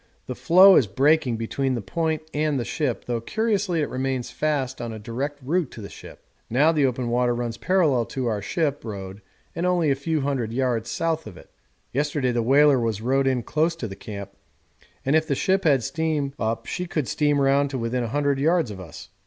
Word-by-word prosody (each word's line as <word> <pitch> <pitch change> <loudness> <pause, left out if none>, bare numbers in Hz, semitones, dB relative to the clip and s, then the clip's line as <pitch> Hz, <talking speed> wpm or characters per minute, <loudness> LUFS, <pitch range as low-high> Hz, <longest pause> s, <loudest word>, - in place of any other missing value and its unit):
The 125 - -4
floe 180 +10 +7
is 120 - +3
breaking 135 +3 +2
between 130 +4 -1
the - - -2
point 160 +10 -2
and 150 -2 0
the 120 - -3
ship, 145 -7 -2
though 120 -2 -2
curiously 205 - 0
it 150 - -1
remains 130 -1 -2
fast 135 -1 -2
on 120 -1 -4
a 110 - -6
direct 125 +7 -4
route 160 +2 0
to 115 - -9
the 100 - -8
ship. - - -12 0.3
Now 145 +7 +4
the 150 -4 +2
open 125 -1 -2
water 120 0 +1
runs 120 -1 -3
parallel 155 -11 +2
to 130 +2 -4
our 110 -3 -1
ship 145 - -1
road 100 -2 -7 0.3
and 165 - -2
only 175 -4 +2
a - - +2
few 155 +2 -1
hundred 130 -5 -2
yards 120 -3 -1
south 160 -5 -1
of 100 - -10
it. - - -16 0.4
Yesterday 145 -1 0
the 120 -1 0
whaler 140 +3 +5
was 115 -3 -1
rowed 135 +4 +1
in 130 -2 +1
close 160 +6 0
to 125 -8 -5
the 95 - -8
camp, 100 -2 -8 0.7
and 135 +3 +2
if 160 0 +2
the 140 - 0
ship 190 +6 +1
had 140 -6 +4
steam 150 0 -1
up 115 +1 -2
she 180 - -4
could 155 -6 -2
steam 145 -1 +1
round 140 +1 +3
to 135 - -4
within 120 +1 -1
a 120 - -2
few - - -8
hundred 145 -1 +1
yards 160 -4 +2
of 95 - -8
us. 85 -5 -10
135 Hz, 220 wpm, -24 LUFS, 120-155 Hz, 0.7 s, floe